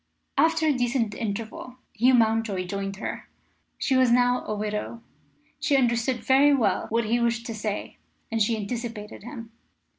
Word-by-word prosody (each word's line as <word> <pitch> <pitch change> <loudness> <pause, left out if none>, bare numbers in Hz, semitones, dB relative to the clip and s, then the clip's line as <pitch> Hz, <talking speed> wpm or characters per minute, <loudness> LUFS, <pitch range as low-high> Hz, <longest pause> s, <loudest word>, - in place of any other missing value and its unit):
After 325 0 +3
a 305 - +4
decent 245 -3 0
interval, 225 +3 -5 0.2
Hugh 250 +3 +4
Mountjoy 220 -5 +1
joined 195 +1 -4
her. 200 - -6 0.5
She 265 - 0
was 255 -2 +4
now 245 +1 +3
a 215 - -2
widow. 210 +2 -4 0.6
She 280 - +2
understood 240 -1 +1
very 280 +2 +5
well 240 -6 +1
what 230 +1 +1
he 235 +3 +1
wished 235 -1 0
to 230 - -4
say, 210 -1 -4 0.3
and 225 0 0
she 220 +2 +2
anticipated 220 0 -5
him. 230 0 -9
230 Hz, 155 wpm, -26 LUFS, 215-250 Hz, 0.6 s, very